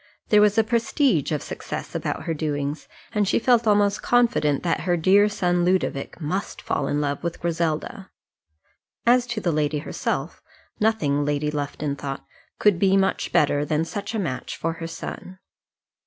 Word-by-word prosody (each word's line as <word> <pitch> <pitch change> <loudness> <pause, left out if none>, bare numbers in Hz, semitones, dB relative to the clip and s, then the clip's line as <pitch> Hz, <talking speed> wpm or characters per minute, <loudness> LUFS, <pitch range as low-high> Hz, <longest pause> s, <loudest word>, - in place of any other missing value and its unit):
There 210 -1 +6
was 210 0 +4
a 225 - +5
prestige 230 - +1
of 150 - -1
success - - -6
about - - -3
her 165 - -2
doings, 145 -1 -3 0.3
and 210 -2 +1
she - - +2
felt 235 -1 +3
almost 205 -1 +3
confident 230 - +2
that 170 - +1
her 175 -1 0
dear 195 +5 +5
son 175 -3 +1
Ludovic 180 -6 0
must 180 +6 -3
fall - - -2
in 145 - 0
love 145 0 -2
with 170 -1 -3
Griselda. 170 +5 -2 1.0
As 245 +1 +4
to 240 -2 -3
the 175 -5 0
lady 150 -1 0
herself, 145 - -3 0.4
nothing, 155 -10 +1
Lady 145 +1 0
Lufton 145 0 -3
thought, 135 -1 -6 0.3
could 205 -5 +3
be 195 0 +4
much 195 0 0
better 145 0 +3
than 155 +2 0
such 205 +5 -5
a - - 0
match 130 -9 -4
for 165 0 -2
her 165 - -3
son. 185 +2 -8
175 Hz, 170 wpm, -24 LUFS, 150-210 Hz, 1.0 s, There